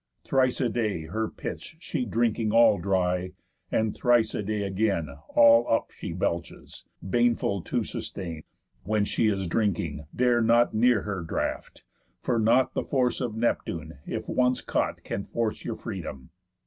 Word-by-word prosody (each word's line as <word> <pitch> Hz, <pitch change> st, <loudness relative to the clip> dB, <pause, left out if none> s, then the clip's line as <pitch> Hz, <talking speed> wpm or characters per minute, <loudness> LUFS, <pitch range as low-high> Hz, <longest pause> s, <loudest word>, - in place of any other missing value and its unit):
Thrice 130 Hz, -2 st, +2 dB
a 130 Hz, -, +2 dB
day 110 Hz, -7 st, -1 dB
her 110 Hz, +8 st, -2 dB
pits -, -, -7 dB
She 145 Hz, -6 st, -3 dB
drinking 115 Hz, 0 st, 0 dB
all 115 Hz, -3 st, +5 dB
dry, 90 Hz, 0 st, 0 dB, 0.4 s
and 110 Hz, -1 st, +1 dB
thrice 120 Hz, -3 st, +3 dB
a -, -, -2 dB
day 105 Hz, 0 st, -2 dB
again 95 Hz, -5 st, 0 dB, 0.3 s
All 115 Hz, 0 st, +6 dB
up 115 Hz, -, +1 dB
she -, -, -7 dB
belches, 85 Hz, -1 st, -4 dB, 0.2 s
baneful 120 Hz, -3 st, +1 dB
to -, -, -1 dB
sustain. 85 Hz, -4 st, -6 dB, 0.4 s
When 105 Hz, +2 st, 0 dB
she 110 Hz, -, +1 dB
is 95 Hz, -3 st, 0 dB
drinking, 85 Hz, -6 st, -1 dB
dare 120 Hz, -1 st, +3 dB
not 115 Hz, +1 st, +4 dB
near 115 Hz, 0 st, +3 dB
her 100 Hz, -3 st, -3 dB
draught, 80 Hz, -, -4 dB, 0.4 s
For 120 Hz, -2 st, +1 dB
not 120 Hz, +4 st, +3 dB
the -, -, -1 dB
force 125 Hz, -3 st, 0 dB
of 115 Hz, -3 st, -2 dB
Neptune, 80 Hz, -, -2 dB
if -, -, -4 dB
once 125 Hz, 0 st, +1 dB
caught, -, -, -2 dB
Can 100 Hz, -, -4 dB
force 115 Hz, -2 st, -2 dB
your 115 Hz, -, -3 dB
freedom. 85 Hz, -, -7 dB
110 Hz, 155 wpm, -27 LUFS, 95-120 Hz, 0.4 s, All